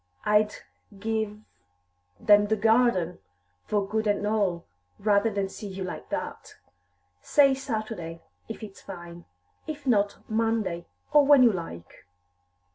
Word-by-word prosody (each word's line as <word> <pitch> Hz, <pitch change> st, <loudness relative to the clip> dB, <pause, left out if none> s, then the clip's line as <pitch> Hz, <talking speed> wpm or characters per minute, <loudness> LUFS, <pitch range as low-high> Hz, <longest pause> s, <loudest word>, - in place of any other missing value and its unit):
"I'd 210 Hz, 0 st, +3 dB, 0.4 s
give 215 Hz, 0 st, -2 dB, 0.8 s
them 205 Hz, 0 st, +5 dB
the 220 Hz, -, +2 dB
garden, 220 Hz, -5 st, +2 dB, 0.5 s
for 205 Hz, -2 st, 0 dB
good 220 Hz, +1 st, -1 dB
and 205 Hz, 0 st, +1 dB
all, 200 Hz, -5 st, 0 dB, 0.3 s
rather 205 Hz, +1 st, +2 dB
than 200 Hz, -2 st, -1 dB
see 205 Hz, +2 st, -8 dB
you 190 Hz, -1 st, -5 dB
like 180 Hz, -, -7 dB
that. -, -, -5 dB, 0.7 s
Say 275 Hz, -, +4 dB
Saturday, 215 Hz, -, -5 dB, 0.3 s
if -, -, -7 dB
it's 200 Hz, -2 st, -10 dB
fine; 175 Hz, -2 st, -10 dB, 0.4 s
if 295 Hz, -2 st, -6 dB
not, 205 Hz, -5 st, +1 dB
Monday, 220 Hz, -6 st, -1 dB, 0.3 s
or 295 Hz, -2 st, +6 dB
when 285 Hz, -3 st, +8 dB
you 240 Hz, -, +6 dB
like." 90 Hz, -, -8 dB
210 Hz, 125 wpm, -27 LUFS, 190-225 Hz, 0.8 s, when